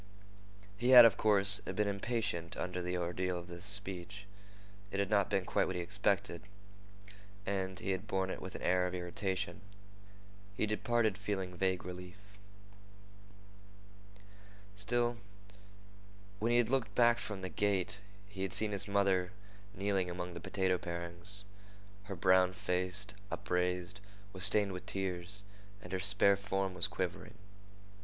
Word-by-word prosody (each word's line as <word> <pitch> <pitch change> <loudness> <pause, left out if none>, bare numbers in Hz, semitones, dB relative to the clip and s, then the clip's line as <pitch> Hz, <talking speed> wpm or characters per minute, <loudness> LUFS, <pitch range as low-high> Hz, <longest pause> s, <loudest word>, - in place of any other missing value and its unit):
He 120 +2 +1
had, 125 -2 +12
of 115 - +5
course, 105 -1 +4
been 105 -1 -2
impatient 100 -4 -2
under 90 0 -3
the 90 +1 -2
ordeal 90 +1 -2
of 85 - -7
this 85 +1 -9
speech. 100 -1 -1 0.6
It 100 - -3
had 100 0 0
not 100 -2 +3
been 95 -3 0
quite - - +1
what 95 - -3
he 90 - -1
expected, 100 -2 0 1.0
and 95 -1 -2
he 95 - -2
had 95 +3 -3
borne 95 -1 -1
it - - -6
with 95 - -7
an - - -7
air 90 0 +3
of 90 - -4
irritation. 95 +3 -3 1.0
He - - +2
departed 110 0 +1
feeling 95 -3 -3
vague 95 0 0
relief. 90 0 -8 2.6
Still, 120 +3 0 1.2
when 115 +3 +1
he 120 - +4
had 120 -1 +2
looked 135 -3 0
back 120 -1 +5
from 105 -4 -5
the 95 - -4
gate, 100 -1 0 0.3
he 100 -1 -8
had 95 -1 -2
seen 105 +2 +2
his 100 0 -1
mother 95 -3 +2 0.4
kneeling 95 -2 0
among 90 0 -5
the 85 - -6
potato 95 +1 0
parings. 85 +4 -2 0.6
Her 100 -1 -5
brown 95 +1 +4
face, 90 +2 -1 0.2
upraised, 90 +2 -2 0.3
was 95 +1 +1
stained 100 0 +3
with 90 -1 -7
tears, 95 0 -2 0.4
and - - -9
her 95 - 0
spare 100 +1 +5
form 95 -1 -2
was 90 +3 +2
quivering. 95 +3 -4
95 Hz, 145 wpm, -34 LUFS, 90-105 Hz, 2.6 s, had